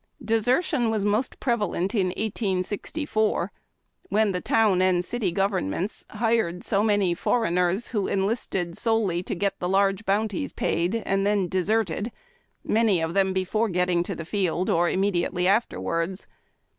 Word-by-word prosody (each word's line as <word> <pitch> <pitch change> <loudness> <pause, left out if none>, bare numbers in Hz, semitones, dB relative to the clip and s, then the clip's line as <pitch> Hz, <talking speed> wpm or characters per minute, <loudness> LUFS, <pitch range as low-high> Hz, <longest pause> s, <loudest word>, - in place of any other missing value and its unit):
Desertion 245 +3 +1
was 215 -2 0
the 205 - +2
most 235 +5 -1
prevalent 210 -6 -1
in 195 -5 +2
1864, 205 - -1 0.6
when 215 -1 +2
the 180 -1 -2
town 210 -5 +3
and 180 -1 +2
city 220 -5 -1
govern 195 - 0
ments 185 - -4
hired 220 -5 0
so 200 - +1
many 205 -5 +2
foreigners, 180 0 0
who 210 -5 -1
enlisted 195 -4 -1
solely 220 -7 +1
to 185 - -4
get 200 +3 -1
the 180 - -2
large 195 +1 +2
bounties 205 0 -1
paid, 175 +6 0
and 195 0 +1
then 200 -2 +1
deserted, 200 +2 0 0.5
many 215 -5 +2
of 165 +1 -2
them 195 0 +2
before 190 +4 0
getting 180 -1 +1
to 175 - -4
the 165 - -6
field, 185 -1 0
or 170 +1 +3
immediately 180 -2 0
afterwards. 190 -3 0
195 Hz, 145 wpm, -25 LUFS, 180-220 Hz, 0.6 s, town